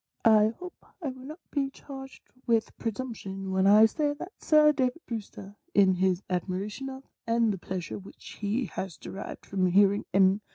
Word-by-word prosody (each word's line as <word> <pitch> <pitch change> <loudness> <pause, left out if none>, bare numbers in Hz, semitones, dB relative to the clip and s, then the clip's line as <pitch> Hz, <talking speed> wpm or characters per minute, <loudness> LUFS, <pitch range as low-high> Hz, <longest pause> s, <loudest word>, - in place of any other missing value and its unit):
" - - -45
I 220 0 +5
hope 360 0 -10 0.2
I 285 - -1
will 260 0 -9
not 310 +4 -11
be 275 -2 0
charged 270 -1 -11 0.2
with 230 -2 +1
presumption 200 -5 -4
when 190 +1 +3
I 210 +2 +8
say 290 +6 0
that 330 +6 -8
Sir 305 -1 +5
David 260 +2 -1
Brewster, 205 -3 -7 0.2
in 195 -2 +6
his 185 0 +1
admiration 195 +8 -3
of, 265 0 -8 0.2
and 230 -2 +2
the 190 - -6
pleasure 180 0 -5
which 195 - -12
he 215 +5 0
has 190 -4 -6
derived 195 - -8
from 190 -2 +1
hearing 200 +2 +4
M. 190 +2 +4
215 Hz, 175 wpm, -28 LUFS, 195-265 Hz, 0.2 s, I